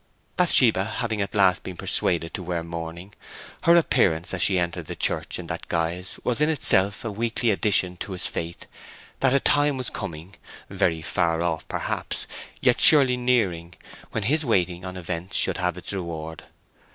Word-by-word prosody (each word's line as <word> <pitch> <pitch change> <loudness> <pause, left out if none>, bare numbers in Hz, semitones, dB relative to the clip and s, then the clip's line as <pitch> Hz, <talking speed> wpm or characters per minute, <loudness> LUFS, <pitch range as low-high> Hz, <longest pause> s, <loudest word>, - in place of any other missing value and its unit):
Bathsheba 125 - +4
having 115 -4 -2
at 100 +1 -4
last 95 -2 +3
been 90 -2 -8
persuaded 85 -1 +2
to - - -5
wear 85 -2 -3
mourning, 85 +3 -7 0.5
her 170 - +6
appearance 90 - +2
as 95 - -2
she 95 - +4
entered 85 -1 -2
the - - -6
church - - -2
in - - -7
that - - -6
guise 85 +2 -3
was 125 +4 0
in 150 - +3
itself 100 -9 +3
a 110 - -2
weekly 115 +2 0
addition 95 -3 0
to 95 - -6
his 90 - -4
faith 85 +1 -4 0.5
that 135 - +3
a - - +4
time 145 0 +3
was 130 -2 -2
coming—very 80 -1 -4
far 85 0 0
off 85 -2 -2
perhaps, - - -4 0.4
yet - - +2
surely 135 -5 +7
nearing—when 105 -5 -2
his 150 +8 +1
waiting 90 - 0
on 95 0 -6
events 90 +1 -5
should - - +1
have 90 -2 -1
its 90 - -7
reward. 80 -4 -6
95 Hz, 165 wpm, -24 LUFS, 85-115 Hz, 0.5 s, surely